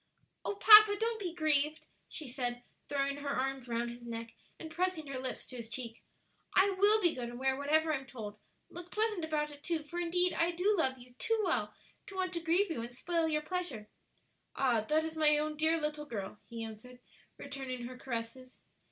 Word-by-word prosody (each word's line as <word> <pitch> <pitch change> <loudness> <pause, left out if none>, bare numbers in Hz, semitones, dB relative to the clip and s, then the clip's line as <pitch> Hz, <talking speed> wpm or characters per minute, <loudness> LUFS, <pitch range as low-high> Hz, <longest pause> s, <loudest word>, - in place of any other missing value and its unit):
"Oh, 410 - -2
papa, 425 0 +9
don't 455 0 0
be 365 -4 -3
grieved," 310 -2 +1 0.2
she 310 - -6
said, 245 -1 -3 0.3
throwing 280 0 0
her 285 0 -4
arms 270 -1 -1
round 235 0 -1
his 240 0 -11
neck 230 -1 -6 0.3
and 320 - -8
pressing 360 -2 -1
her 275 -2 -5
lips 255 0 -4
to 255 - -10
his 230 -2 -7
cheek. 230 0 -5 0.5
"I 390 +2 +5
will 405 +3 +5
be 345 -2 +4
good 245 -2 -4
and 240 - -8
wear 265 +1 +1
whatever 310 +3 +2
I'm 270 -2 -3
told; 215 -5 -8 0.3
look 350 +1 -8
pleasant 425 -3 0
about 300 -1 -1
it 290 0 -13
too, 325 0 -2
for 340 +4 -6
indeed 355 +1 +2
I 335 - +2
do 360 +5 +2
love 265 -7 +1
you 245 0 -15
too 450 0 +1
well - - 0 0.3
to 390 - -9
want 370 -1 -1
to 340 - -1
grieve 340 +4 +2
you 275 - -2
and 235 +1 -6
spoil 330 +6 -1
your 305 -1 0
pleasure." 305 - -4 0.7
"Ah, 245 -5 +2
that 305 +8 +1
is 320 0 -4
my 300 -1 +5
own 305 +1 -1
dear 315 +2 +2
little 300 -1 -2
girl," 210 -4 -5
he 230 -1 -5
answered, 225 +3 -9 0.4
returning 270 -3 -5
her 255 +1 -7
caresses. 250 0 -6
295 Hz, 205 wpm, -33 LUFS, 250-340 Hz, 0.7 s, papa